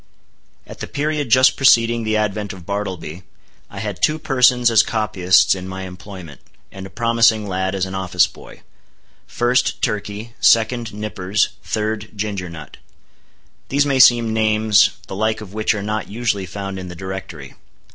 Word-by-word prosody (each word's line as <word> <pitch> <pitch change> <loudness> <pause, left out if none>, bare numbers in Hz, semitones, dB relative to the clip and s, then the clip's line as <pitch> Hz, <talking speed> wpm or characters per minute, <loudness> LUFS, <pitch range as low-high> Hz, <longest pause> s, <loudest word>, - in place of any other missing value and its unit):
At - - -12
the - - -5
period 150 -2 -2
just 130 +3 +5
preceding 120 -3 +4
the 110 0 0
advent 105 -1 -2
of 90 -3 -12
Bartleby, 95 -4 -5 0.5
I 100 - -12
had 100 -3 -5
two 155 - +2
persons 125 -4 +3
as 110 -1 +6
copyists 95 -5 +2
in 95 -1 -6
my 95 0 -6
employment, 90 -4 -10 0.3
and 95 0 -9
a - - -15
promising 115 -2 +2
lad 95 0 -2
as 95 -1 -1
an 95 - -7
office 95 -2 +2
boy. - - -14 0.6
First, 120 +1 0
Turkey; 105 +2 -3
second, 115 0 +3
Nippers; 105 -1 -1
third, 110 0 -3
Ginger 100 -3 -4
Nut. 80 -3 -11 0.9
These 140 +1 +2
may 135 -2 0
seem 120 -3 +5
names, 110 -1 +3 0.2
the - - -8
like 110 +2 0
of 105 -3 -11
which 110 0 0
are 100 - -4
not 105 +1 -3
usually 105 -3 -2
found 95 +1 -6
in 90 - -7
the 90 - -9
Directory. 95 -6 -8
105 Hz, 160 wpm, -19 LUFS, 95-115 Hz, 0.9 s, as